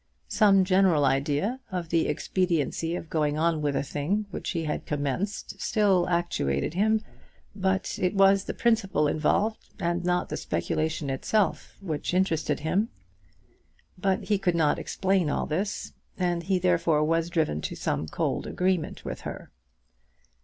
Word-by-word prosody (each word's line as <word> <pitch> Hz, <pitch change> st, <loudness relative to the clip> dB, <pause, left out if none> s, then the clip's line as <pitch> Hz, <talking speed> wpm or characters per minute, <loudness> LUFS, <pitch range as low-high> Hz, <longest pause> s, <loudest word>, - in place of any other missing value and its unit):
Some 195 Hz, -3 st, +5 dB
general 185 Hz, -6 st, +4 dB
idea 145 Hz, -, 0 dB
of 175 Hz, -3 st, -3 dB
the 165 Hz, -1 st, +2 dB
expediency 165 Hz, 0 st, 0 dB
of 165 Hz, -, -6 dB
going 150 Hz, -2 st, 0 dB
on 160 Hz, -1 st, +1 dB
with 145 Hz, -2 st, 0 dB
a -, -, 0 dB
thing 155 Hz, +9 st, -1 dB
which -, -, -5 dB
he 165 Hz, -3 st, -1 dB
had 150 Hz, -, -3 dB
commenced 150 Hz, +8 st, -3 dB
still 195 Hz, -4 st, +2 dB
actuated 165 Hz, -, 0 dB
him; 220 Hz, +4 st, +2 dB, 0.5 s
but 190 Hz, -1 st, -1 dB
it 185 Hz, +2 st, +1 dB
was 195 Hz, 0 st, +5 dB
the -, -, -3 dB
principle 195 Hz, -10 st, +2 dB
involved, 200 Hz, +9 st, 0 dB
and 175 Hz, -1 st, -1 dB
not 180 Hz, 0 st, 0 dB
the -, -, -3 dB
speculation 155 Hz, -3 st, -2 dB
itself, 200 Hz, +10 st, 0 dB
which 170 Hz, -1 st, -3 dB
interested 180 Hz, -4 st, +1 dB
him. 195 Hz, +8 st, +1 dB, 1.1 s
But 190 Hz, 0 st, 0 dB
he 205 Hz, -2 st, +1 dB
could 180 Hz, -3 st, +1 dB
not 155 Hz, -3 st, +2 dB
explain 190 Hz, -4 st, 0 dB
all -, -, 0 dB
this, 190 Hz, +7 st, -3 dB, 0.2 s
and 175 Hz, -2 st, 0 dB
he 190 Hz, +2 st, +1 dB
therefore 170 Hz, -4 st, +2 dB
was 165 Hz, +2 st, +1 dB
driven 155 Hz, -, 0 dB
to -, -, -4 dB
some 75 Hz, +2 st, -2 dB
cold -, -, -2 dB
agreement 180 Hz, -3 st, -1 dB
with -, -, -5 dB
her. -, -, -7 dB
175 Hz, 150 wpm, -27 LUFS, 155-195 Hz, 1.1 s, Some